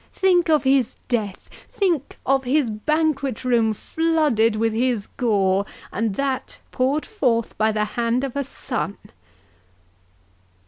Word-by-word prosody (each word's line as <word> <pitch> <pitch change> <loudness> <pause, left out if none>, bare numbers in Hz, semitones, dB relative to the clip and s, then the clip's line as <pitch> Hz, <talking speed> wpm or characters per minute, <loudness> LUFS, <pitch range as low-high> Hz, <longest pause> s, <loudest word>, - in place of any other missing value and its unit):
—think 360 -3 +3
of 305 -4 +4
his 265 -3 +2
death!—think 260 - -2
of 270 0 +2
his 260 -2 +1
banquet 275 +1 -1
room 235 -3 +3
flooded 295 -4 +1
with 225 0 +1
his 235 -2 0
gore, 200 -5 +1 0.3
and 215 0 -1
that 270 0 -2
poured 275 +4 0
forth 245 - 0
by 220 +1 +2
the 210 0 0
hand 235 +3 -1
of 275 -2 -4
a 280 - 0
son!" 245 -5 -4
250 Hz, 125 wpm, -22 LUFS, 220-285 Hz, 0.3 s, of